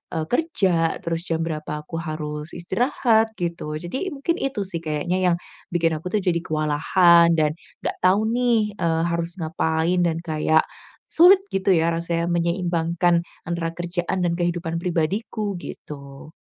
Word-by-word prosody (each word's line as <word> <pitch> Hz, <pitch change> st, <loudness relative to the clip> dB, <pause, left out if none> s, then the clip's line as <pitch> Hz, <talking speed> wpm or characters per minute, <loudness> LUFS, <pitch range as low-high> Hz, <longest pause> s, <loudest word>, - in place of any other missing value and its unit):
eee, 160 Hz, -, 0 dB
kerja 190 Hz, -, +1 dB
terus 165 Hz, +1 st, -3 dB
jam 165 Hz, 0 st, -1 dB
berapa 150 Hz, -2 st, -4 dB
aku 165 Hz, +2 st, -6 dB
harus 155 Hz, -1 st, -5 dB
istirahat 220 Hz, +4 st, +1 dB
gitu. 170 Hz, -3 st, -3 dB
Jadi 180 Hz, -, -4 dB
mungkin 335 Hz, +6 st, -1 dB
itu 270 Hz, -6 st, -2 dB
sih 180 Hz, -3 st, -3 dB
kayaknya 155 Hz, +4 st, -1 dB, 0.2 s
yang, 170 Hz, -, -1 dB, 0.4 s
bikin 165 Hz, -1 st, +2 dB
aku 155 Hz, -, -7 dB
tuh 210 Hz, -, +2 dB
jadi 170 Hz, -2 st, +1 dB
kewalahan 170 Hz, +3 st, +4 dB
dan 155 Hz, -2 st, +2 dB, 0.3 s
gak -, -, -2 dB
tahu 190 Hz, +4 st, +4 dB
nih, 235 Hz, -4 st, +2 dB
eee, 165 Hz, -1 st, +1 dB
harus 170 Hz, 0 st, -2 dB
ngapain 160 Hz, +2 st, 0 dB
dan 165 Hz, -1 st, -1 dB
kayak 160 Hz, -1 st, +2 dB, 0.5 s
sulit 365 Hz, +4 st, +7 dB
gitu 195 Hz, 0 st, +2 dB
ya 165 Hz, 0 st, +2 dB
rasanya 170 Hz, 0 st, -1 dB
menyeimbangkan 170 Hz, 0 st, +1 dB, 0.3 s
antara 170 Hz, -1 st, -2 dB
kerjaan 175 Hz, +1 st, -2 dB
dan 170 Hz, -, +1 dB
kehidupan 170 Hz, -1 st, -1 dB
pribadiku 195 Hz, +4 st, -1 dB
gitu. 140 Hz, +1 st, -10 dB
170 Hz, 145 wpm, -23 LUFS, 160-190 Hz, 0.5 s, sulit